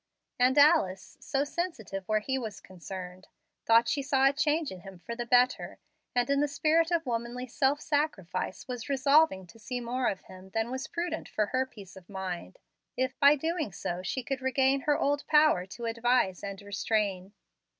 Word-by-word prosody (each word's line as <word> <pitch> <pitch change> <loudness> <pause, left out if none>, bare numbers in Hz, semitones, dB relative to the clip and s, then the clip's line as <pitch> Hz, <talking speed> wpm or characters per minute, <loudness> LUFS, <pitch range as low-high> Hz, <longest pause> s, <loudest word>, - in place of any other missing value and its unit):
And 255 +3 +4
Alice, 285 - +4
so 275 -1 -1
sensitive 285 - -4
where 215 0 +1
he 265 +4 -1
was 215 -4 -6
concerned, 185 0 -9 0.4
thought 230 +1 +6
she 280 - 0
saw 270 -1 +3
a 275 - +3
change 305 0 0
in 185 - -8
him 190 +1 -11
for 235 +7 -7
the 240 0 -4
better, 250 +1 +2 0.4
and 245 0 +2
in 280 0 +2
the 295 - +2
spirit 315 +3 +2
of 335 -2 0
womanly 240 +1 -3
self 270 +3 +1
sacrifice 250 - -2
was 245 -1 -6
resolving 275 -6 +3
to 180 +6 -17
see 245 +3 -4
more 245 +1 -1
of 195 - -2
him 185 0 -13
than 225 +2 0
was 260 +1 -4
prudent 335 -1 -4
for 210 - 0
her 260 +5 -1
peace 200 -7 -13
of 185 -2 -14
mind, 190 - -5 0.4
if 260 +1 -1
by 285 +1 +7
so 280 - -12
doing 320 - -1 0.3
she 255 +7 -3
could 270 +1 -3
regain 265 +1 +2
her 295 +1 +2
old 285 +1 0
power 300 - +4
to 230 +5 -7
advise 230 -4 +1
and 200 -1 -6
restrain. 200 -2 -1
250 Hz, 185 wpm, -29 LUFS, 200-285 Hz, 0.4 s, by